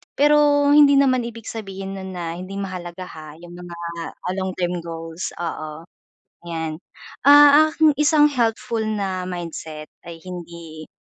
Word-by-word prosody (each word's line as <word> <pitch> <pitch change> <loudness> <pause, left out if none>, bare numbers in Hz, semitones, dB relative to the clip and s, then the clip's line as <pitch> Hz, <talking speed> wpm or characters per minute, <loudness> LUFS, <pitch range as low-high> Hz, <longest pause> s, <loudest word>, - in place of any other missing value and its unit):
Pero 290 0 +4
hindi 290 -1 +7
naman 255 -3 +3
ibig 230 -1 -10
sabihin 195 -3 -6
no'n 190 0 -7
na 170 -2 -5
hindi 185 +2 -8
mahalaga 185 -1 -6
ha, 155 -1 -10
'yong 175 0 -12
mga, 175 -1 -10 0.4
ah, 180 - -5
long 190 0 -2
term 180 0 -1
goals, 165 +1 -6
oo. 155 -2 -5 0.7
Yan, 160 -2 -4 0.5
ah, 290 +1 +8
ang 310 -3 +4
isang 300 0 +5
helpful 230 -3 -1
na 195 -4 -3
mindset 160 -3 -7 0.2
ay 170 -1 -9
hindi, 170 -3 -9
185 Hz, 140 wpm, -21 LUFS, 170-250 Hz, 0.7 s, ah